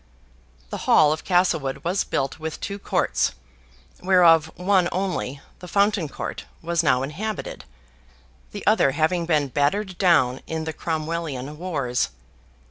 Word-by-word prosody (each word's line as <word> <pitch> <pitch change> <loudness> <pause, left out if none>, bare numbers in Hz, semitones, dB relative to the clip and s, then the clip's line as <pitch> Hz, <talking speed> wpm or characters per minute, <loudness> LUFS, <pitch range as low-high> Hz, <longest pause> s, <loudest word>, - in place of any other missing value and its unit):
The - - -5
Hall 150 -1 +6
of 160 - -6
Castlewood 175 -7 +1
was 180 +3 0
built 135 +3 -2
with 160 0 -5
two 200 0 -5
courts, - - 0 0.7
whereof 170 -4 +5
one 185 -1 +2
only, 180 -7 -2 0.2
the 180 - -10
fountain 200 -3 +1
court, - - -6 0.2
was 170 0 +1
now 130 -5 +2
inhabited, 195 +10 -5 0.9
the - - -7
other 135 - +4
having 165 +3 +1
been 150 -4 +2
battered 175 +8 0
down 135 -9 +3
in 160 0 -3
the 160 0 -4
Cromwellian 155 -4 -3
wars. 140 -9 -1
165 Hz, 130 wpm, -23 LUFS, 145-180 Hz, 0.9 s, Hall